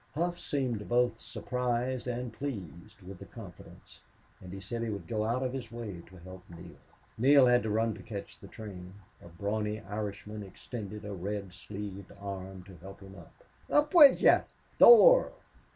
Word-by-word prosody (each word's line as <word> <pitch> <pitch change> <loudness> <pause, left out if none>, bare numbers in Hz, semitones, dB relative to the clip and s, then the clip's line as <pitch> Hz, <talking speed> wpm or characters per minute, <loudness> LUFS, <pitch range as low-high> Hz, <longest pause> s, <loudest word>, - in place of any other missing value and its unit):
Hough 175 +2 -1
seemed 125 -7 -3
both 120 -1 +1
surprised 125 0 -3
and 125 -1 -4
pleased 100 - -8
with 90 0 -10
the - - -11
confidence, 100 -7 -13 0.4
and 90 - -10
he 95 - -7
said 115 +5 -5
he 115 - -2
would 100 -5 -5
go 110 +4 -2
out 120 +4 -1
of 130 -1 -3
his 125 -4 -6
way 110 -7 -7
to 95 - -16
help 95 +1 -12
Neale. 85 0 -11 0.5
Neale 135 +2 +6
had 125 0 +4
to 110 - -3
run 110 +1 0
to 105 - -11
catch 100 -1 -8
the - - -12
train. 95 -4 -10 0.3
A - - -13
brawny 105 +5 -3
Irishman 105 0 -6
extended 105 +1 -8
a 105 - -5
red 100 0 -5
sleeved 100 0 -8
arm 95 -1 -7
to 95 -1 -14
help 95 +4 -12
him 95 0 -12
up. 85 -4 -16 0.3
"Up 295 0 +2
wid 295 -6 +8
yez. - - +5 0.4
Thor!" - - +8
105 Hz, 175 wpm, -30 LUFS, 95-120 Hz, 0.5 s, wid